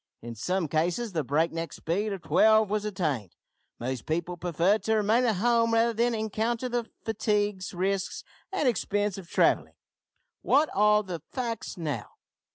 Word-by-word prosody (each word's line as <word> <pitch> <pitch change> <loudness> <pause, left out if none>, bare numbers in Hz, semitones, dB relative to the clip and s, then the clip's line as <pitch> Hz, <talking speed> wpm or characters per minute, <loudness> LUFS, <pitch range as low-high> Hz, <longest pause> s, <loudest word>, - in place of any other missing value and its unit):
In 120 0 -6
some 180 - -1
cases 175 +10 0
the 160 -3 0
break 150 +5 +1
neck 165 -2 -4
speed 200 +6 -2
of 195 -3 -5
twelve 215 +6 +4
was 210 0 0
attained. 150 - -2 0.4
Most 125 -1 -4
people 170 +3 -1
preferred 175 +4 +1
to 220 - +2
remain 220 +4 +3
at 225 -3 +2
home 230 +3 +2
rather 230 +1 +3
than 235 +1 +1
encounter 220 +3 -1
the 240 -2 -2 0.2
fatigues, 205 -3 0
risks, 190 +1 -2 0.3
and 345 -8 0
expense 205 -3 0
of 175 -3 -12
travelling. - - +2 0.7
What 300 +2 +3
are 210 +1 +4
the 180 -5 -6
facts 235 -7 -4
now? 155 -4 -3
205 Hz, 160 wpm, -28 LUFS, 170-225 Hz, 0.7 s, twelve